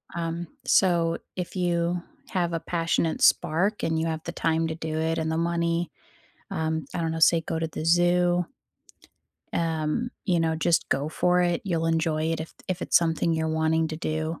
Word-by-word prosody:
Um 170 0 -3 0.2
So 170 -3 +3 0.2
if 180 0 -5
you 175 -1 0 0.3
have 175 -3 -1
a 165 - 0
passionate 165 -1 -1
spark 190 +7 +3
and 160 -1 +1
you 165 - 0
have 160 -1 -3
the 170 - -3
time 165 -1 0
to 160 - -3
do 160 -1 -4
it 160 +1 0
and 160 0 -1
the 160 - -1
money, 170 0 0 0.6
um, 160 -1 -1
I 175 - -2
don't 165 -1 -1
know, 160 - -3
say 165 +1 +5
go 160 0 -3
to 165 - -1
the 155 0 -6
zoo 175 +1 +3 1.1
um, 165 +8 -1
you 180 -4 +2
know, 160 0 +1
just 165 +1 +1
go 140 +2 0
for 180 +3 +2
it, 175 -1 +1
you'll 165 -4 0
enjoy 160 -1 +1
it 165 - -3
if 160 - -7
if 185 -1 -2
it's - - +3
something 165 0 0
you're 160 0 0
wanting 160 0 +1
to 155 - -5
do. 155 0 -3
165 Hz, 190 wpm, -26 LUFS, 160-175 Hz, 1.1 s, say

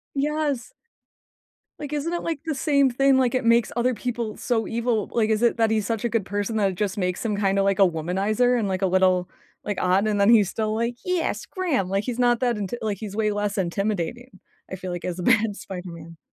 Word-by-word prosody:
Yes. 285 -3 -1 1.1
Like, 295 -1 -6
isn't 300 +3 -2
it, 345 - -2
like, 330 -3 -2
the 315 -3 -2
same 280 -1 +3
thing? 270 +2 +3
Like, 255 -1 +2
it 255 - 0
makes 230 0 +3
other 245 +1 +1
people 235 -2 -4
so 230 -3 -1
evil, 230 -2 -1
like, 220 -2 +1
is 215 0 +1
it 240 0 +3
that 225 -1 +3
he's 215 -2 +1
such 225 +2 -2
a - - +1
good 225 -4 -1
person 205 +3 -2
that 200 -2 +2
it 185 - -5
just 200 +1 -2
makes 180 +1 -2
him 215 -2 0
kinda 195 -1 +1
like 195 0 +1
a - - +5
womanizer 195 +9 +1
and, 220 -4 0
like, 185 -1 -2
a - - +3
little 185 -1 +2 0.4
like, 205 -3 -2
odd, 185 +3 +2
and 205 -1 +1
then 200 - +5
he's 220 -4 +6
still 215 +2 -2
like, 235 +2 -1
"Yes, 365 -2 -1
Graham." 310 - -1
Like, 195 +1 0
he's 245 0 -4
not 240 -1 +3
that 245 -2 +1
inti 205 +1 -4
like, 205 -3 -2
he's 205 -3 -6
way 215 -1 +1
less 205 0 -2
intimidating, 195 +4 -2 0.3
I - - -3
feel 185 0 -6
like, 175 0 -5
as 180 -1 -3
a 180 - -5
bad 225 -1 +3
Spider-Man. 170 -4 -9
215 Hz, 230 wpm, -24 LUFS, 195-245 Hz, 1.1 s, he's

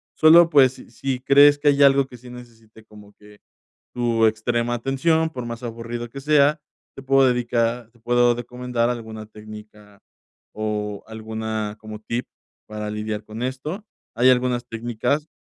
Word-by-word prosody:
Solo, 165 +2 +7
pues, 135 -4 +5
si - - -15
si 135 -2 -3
crees 140 +2 +6
que 145 - +3
hay 145 0 +2
algo 140 0 +5
que 125 - -13
sí 125 +1 -14
necesite 115 -3 -14
como 105 -1 -16
que 105 0 -19 0.6
tu 115 -2 +2
extrema 120 +2 -1
atención, 150 +6 0
por 125 -5 -7
más 115 +1 -7
aburrido 120 0 -6
que 140 - -8
sea, 150 +1 +3 0.4
te 135 - -9
puedo 135 0 +4
dedicar 120 -1 -1
te 120 - -26
puedo 120 +1 +3
recomendar 125 0 -3
alguna 110 -2 -6
técnica 105 -1 -14 0.5
o 105 -1 -4
alguna 110 -1 -5
como 110 -1 -9
tip 115 +3 -4 0.4
para 105 0 -5
lidiar 105 0 -4
con 110 +2 -8
esto. 150 - -5 0.3
Hay 125 +2 +5
algunas 125 -1 0
técnicas 120 +6 -2
120 Hz, 155 wpm, -22 LUFS, 110-130 Hz, 0.6 s, Solo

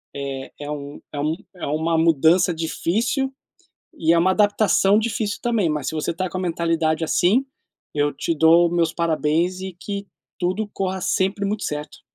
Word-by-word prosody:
É 135 -1 -5
é 145 0 -5
um 145 -1 -7
é 145 - -4
um 155 +2 0 0.2
é 180 - -5
uma 160 +3 0
mudança 165 +3 +4
difícil 215 - -1 0.7
e 165 +1 +3
é 170 - +4
uma 180 +3 +3
adaptação 205 -1 +3
difícil 220 -2 -1
também, 225 -8 +1
mas 150 -1 -2
se - - -3
você 155 +1 -1
está 185 +3 -2
com 185 - -6
a - - -3
mentalidade 165 -2 0
assim, 185 - +3 0.5
eu 145 0 +1
te 165 +4 -2
dou 165 +2 +5
os - - -6
meus 165 -1 +2
parabéns 170 +2 0
e 190 0 -5
que 200 +4 -6 0.3
tudo 185 +4 -1
corra 190 -1 -2
sempre 190 +3 0
muito 210 +1 -2
certo. 150 0 -5
170 Hz, 180 wpm, -22 LUFS, 155-190 Hz, 0.7 s, dou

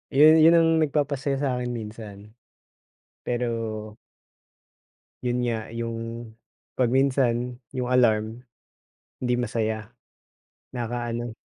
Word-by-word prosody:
Yun, 155 +3 +7
yun 165 - +8
ang 165 0 +4
nagpapasaya 140 -2 -1
sa'kin 125 -3 -1
minsan. 105 -2 -8 0.9
Pero 115 -3 -3 1.3
yun 125 -1 0
nga 115 -2 -2
yung, 115 0 -5 0.4
pag 125 -2 +1
minsan 125 -2 +1 0.2
yung 125 - -1
alarm, 110 -2 +2 0.8
hindi 125 -1 0
masaya, 110 -3 -2 0.8
nakaka-ano. 120 0 -3
120 Hz, 90 wpm, -25 LUFS, 115-130 Hz, 1.3 s, yun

